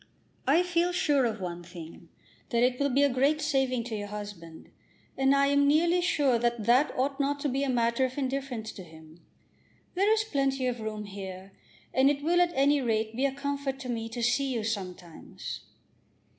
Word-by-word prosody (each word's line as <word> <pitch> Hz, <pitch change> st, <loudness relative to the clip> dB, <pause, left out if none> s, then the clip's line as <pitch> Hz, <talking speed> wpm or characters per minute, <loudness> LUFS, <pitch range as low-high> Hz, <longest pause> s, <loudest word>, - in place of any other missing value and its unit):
"I 315 Hz, +6 st, +5 dB
feel 350 Hz, 0 st, +1 dB
sure 290 Hz, -7 st, +2 dB
of 225 Hz, -3 st, -2 dB
one 175 Hz, -2 st, -5 dB
thing, 170 Hz, -1 st, -11 dB, 0.4 s
that 235 Hz, 0 st, +2 dB
it 250 Hz, 0 st, +2 dB
will 280 Hz, 0 st, +2 dB
be 275 Hz, +2 st, +3 dB
a -, -, +6 dB
great 280 Hz, +4 st, +2 dB
saving 270 Hz, -5 st, 0 dB
to 230 Hz, -1 st, -5 dB
your 205 Hz, -1 st, -4 dB
husband, 205 Hz, -6 st, -9 dB, 0.4 s
and 270 Hz, +1 st, +3 dB
I 280 Hz, 0 st, +4 dB
am 285 Hz, 0 st, +3 dB
nearly 335 Hz, +4 st, +3 dB
sure 285 Hz, -8 st, +2 dB
that 235 Hz, -1 st, 0 dB
that 250 Hz, +6 st, +4 dB
ought 275 Hz, +2 st, 0 dB
not 285 Hz, +1 st, 0 dB
to 295 Hz, -, 0 dB
be 270 Hz, +2 st, -1 dB
a 280 Hz, -, -1 dB
matter 235 Hz, 0 st, +1 dB
of 255 Hz, +1 st, -5 dB
indifference 265 Hz, -5 st, -3 dB
to 190 Hz, -, -10 dB
him. 160 Hz, 0 st, -15 dB, 0.7 s
There 395 Hz, +4 st, +2 dB
is 440 Hz, -1 st, +3 dB
plenty 275 Hz, -8 st, 0 dB
of 245 Hz, -1 st, -1 dB
room 215 Hz, -1 st, -4 dB
here, 190 Hz, -1 st, -8 dB, 0.4 s
and 265 Hz, +1 st, +5 dB
it 285 Hz, 0 st, -1 dB
will 350 Hz, +3 st, +3 dB
at 350 Hz, -1 st, +3 dB
any 280 Hz, +1 st, +3 dB
rate 220 Hz, -2 st, -1 dB
be 265 Hz, +3 st, +2 dB
a -, -, -3 dB
comfort 280 Hz, -1 st, -3 dB
to 255 Hz, -, -6 dB
me 225 Hz, -1 st, -3 dB
to 235 Hz, +1 st, -4 dB
see 265 Hz, +3 st, +1 dB
you 230 Hz, -4 st, -2 dB
sometimes." 185 Hz, -6 st, -6 dB
255 Hz, 200 wpm, -28 LUFS, 220-280 Hz, 0.7 s, a